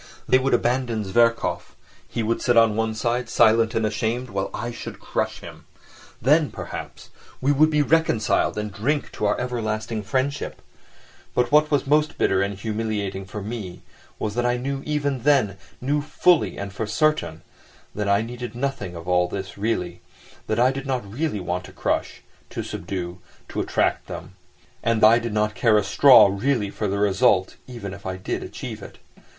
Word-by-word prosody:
They 130 Hz, -, +5 dB
would 130 Hz, -1 st, +2 dB
abandon 120 Hz, -2 st, 0 dB
Zverkov, 115 Hz, +4 st, +1 dB, 0.3 s
he 115 Hz, -, -3 dB
would 115 Hz, +2 st, -1 dB
sit 120 Hz, -1 st, +2 dB
on 115 Hz, -2 st, +5 dB
one 110 Hz, 0 st, -1 dB
side, 120 Hz, +1 st, -1 dB
silent 115 Hz, -1 st, +4 dB
and 115 Hz, -, +1 dB
ashamed, 115 Hz, +3 st, -2 dB
while 95 Hz, 0 st, -2 dB
I 120 Hz, +1 st, -4 dB
should -, -, -8 dB
crush -, -, -3 dB
him. -, -, -11 dB, 0.5 s
Then, 150 Hz, +5 st, +3 dB
perhaps, -, -, -8 dB, 0.3 s
we 140 Hz, -, +2 dB
would 155 Hz, +2 st, +4 dB
be 150 Hz, -1 st, +2 dB
reconciled 145 Hz, -11 st, +2 dB
and 105 Hz, -1 st, -3 dB
drink 140 Hz, +9 st, -1 dB
to 105 Hz, -, -3 dB
our -, -, +1 dB
everlasting 110 Hz, -3 st, -2 dB
friendship; 130 Hz, +7 st, -2 dB, 0.8 s
but 125 Hz, +2 st, +1 dB
what 150 Hz, +1 st, +5 dB
was 145 Hz, -2 st, +1 dB
most 150 Hz, +2 st, +2 dB
bitter 95 Hz, 0 st, +2 dB
and 100 Hz, 0 st, -2 dB
humiliating 105 Hz, -2 st, -3 dB
for 105 Hz, +1 st, -7 dB
me 105 Hz, -4 st, -6 dB, 0.3 s
was 105 Hz, -, -3 dB
that 120 Hz, +2 st, 0 dB
I 120 Hz, 0 st, +1 dB
knew 135 Hz, +2 st, -3 dB
even 145 Hz, -3 st, -1 dB
then, 130 Hz, -8 st, +3 dB, 0.2 s
knew 145 Hz, +3 st, 0 dB
fully 170 Hz, +3 st, +2 dB
and 100 Hz, 0 st, -5 dB
for 110 Hz, +1 st, -3 dB
certain, 155 Hz, -, 0 dB, 0.5 s
that 105 Hz, -1 st, -2 dB
I 100 Hz, +2 st, +3 dB
needed 120 Hz, 0 st, -7 dB
nothing 125 Hz, -8 st, -3 dB
of 85 Hz, +1 st, -9 dB
all 90 Hz, -1 st, +3 dB
this 95 Hz, +1 st, -6 dB
really, 90 Hz, -5 st, -2 dB, 0.5 s
that 110 Hz, -, 0 dB
I 125 Hz, +2 st, +5 dB
did 135 Hz, 0 st, -6 dB
not 130 Hz, -5 st, -1 dB
really 125 Hz, +2 st, -2 dB
want 90 Hz, 0 st, -3 dB
to -, -, -12 dB
crush, -, -, -2 dB, 0.3 s
to -, -, -4 dB
subdue, 90 Hz, 0 st, -5 dB, 0.3 s
to -, -, -2 dB
attract -, -, 0 dB
them, -, -, -8 dB, 0.5 s
and 115 Hz, -1 st, +1 dB
that 110 Hz, -, +9 dB
I 115 Hz, +2 st, +6 dB
did 120 Hz, -1 st, -4 dB
not 105 Hz, 0 st, +1 dB
care 110 Hz, -1 st, +3 dB
a 105 Hz, -, +2 dB
straw 125 Hz, +5 st, +7 dB
really 105 Hz, 0 st, 0 dB
for 105 Hz, -, -3 dB
the 100 Hz, +1 st, -1 dB
result, 100 Hz, -2 st, +2 dB
even 115 Hz, -6 st, -7 dB
if 100 Hz, -1 st, -9 dB
I 95 Hz, 0 st, -3 dB
did 95 Hz, -, -3 dB
achieve -, -, -7 dB
it. -, -, -11 dB
115 Hz, 180 wpm, -23 LUFS, 100-130 Hz, 0.8 s, that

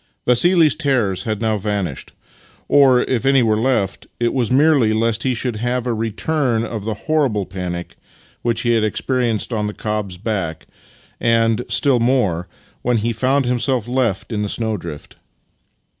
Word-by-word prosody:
Vassili's 160 Hz, +5 st, +4 dB
terrors 120 Hz, -10 st, 0 dB
had 110 Hz, -2 st, -2 dB
now 110 Hz, -2 st, 0 dB
vanished 100 Hz, -8 st, -3 dB, 0.3 s
— -, -, -30 dB
or, 130 Hz, -3 st, +5 dB
if 125 Hz, -3 st, -1 dB
any 135 Hz, -1 st, +4 dB
were 110 Hz, -2 st, +2 dB
left, 110 Hz, -4 st, 0 dB
it 120 Hz, 0 st, +1 dB
was 125 Hz, -5 st, 0 dB
merely 135 Hz, -5 st, +4 dB
lest 115 Hz, 0 st, 0 dB
he 130 Hz, -1 st, 0 dB
should 120 Hz, -1 st, -2 dB
have 120 Hz, +2 st, -1 dB
a 120 Hz, -, 0 dB
return 115 Hz, +2 st, -1 dB
of 110 Hz, -3 st, -5 dB
the 110 Hz, -1 st, -2 dB
horrible 135 Hz, -11 st, +1 dB
panic 90 Hz, -2 st, -6 dB, 0.5 s
which 115 Hz, -2 st, 0 dB
he 120 Hz, -, +1 dB
had 115 Hz, -2 st, +2 dB
experienced 120 Hz, +1 st, -1 dB
on 105 Hz, -2 st, -1 dB
the 105 Hz, -, -6 dB
cob's 105 Hz, -4 st, -3 dB
back, 90 Hz, -6 st, -3 dB, 0.5 s
and, 115 Hz, 0 st, +2 dB
still 135 Hz, -4 st, +3 dB
more, 115 Hz, -9 st, +1 dB, 0.3 s
when 125 Hz, -1 st, +1 dB
he 115 Hz, +2 st, -1 dB
found 130 Hz, +4 st, +1 dB
himself 125 Hz, -1 st, 0 dB
left 120 Hz, -5 st, -1 dB
in 105 Hz, -2 st, -2 dB
the 105 Hz, -, -2 dB
snowdrift. 100 Hz, -11 st, -4 dB
115 Hz, 160 wpm, -19 LUFS, 105-125 Hz, 0.5 s, or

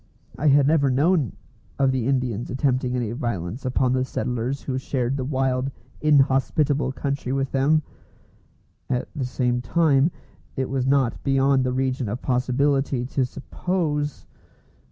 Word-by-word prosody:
I 150 Hz, -, 0 dB
had 140 Hz, -1 st, +5 dB
never 145 Hz, -2 st, +3 dB
known 145 Hz, -, +2 dB, 0.4 s
of 135 Hz, -1 st, +3 dB
the 130 Hz, -2 st, -1 dB
Indians 125 Hz, -4 st, -1 dB
attempting 130 Hz, -1 st, 0 dB
any 120 Hz, -3 st, -1 dB
violence 115 Hz, -1 st, -4 dB
upon 130 Hz, 0 st, +1 dB
the 130 Hz, 0 st, +1 dB
settlers 125 Hz, +1 st, -3 dB
who 130 Hz, -1 st, -2 dB
shared 130 Hz, -1 st, -1 dB
the 135 Hz, -, -2 dB
wild, 130 Hz, -1 st, 0 dB, 0.3 s
inhospitable 140 Hz, -1 st, +2 dB
country 140 Hz, -1 st, -3 dB
with 135 Hz, 0 st, -1 dB
them; 150 Hz, +3 st, +2 dB, 1.1 s
at 125 Hz, -1 st, -1 dB
the 135 Hz, -4 st, -2 dB
same 125 Hz, -1 st, 0 dB
time, 155 Hz, 0 st, +3 dB, 0.5 s
it 130 Hz, -2 st, -2 dB
was 130 Hz, -1 st, 0 dB
not 135 Hz, -4 st, +2 dB
beyond 135 Hz, -1 st, +3 dB
the 130 Hz, -, 0 dB
region 130 Hz, -2 st, -1 dB
of 120 Hz, +5 st, -3 dB
possibility 130 Hz, +1 st, +1 dB
to 135 Hz, +1 st, 0 dB
suppose. 150 Hz, +1 st, -2 dB
135 Hz, 140 wpm, -24 LUFS, 125-140 Hz, 1.1 s, had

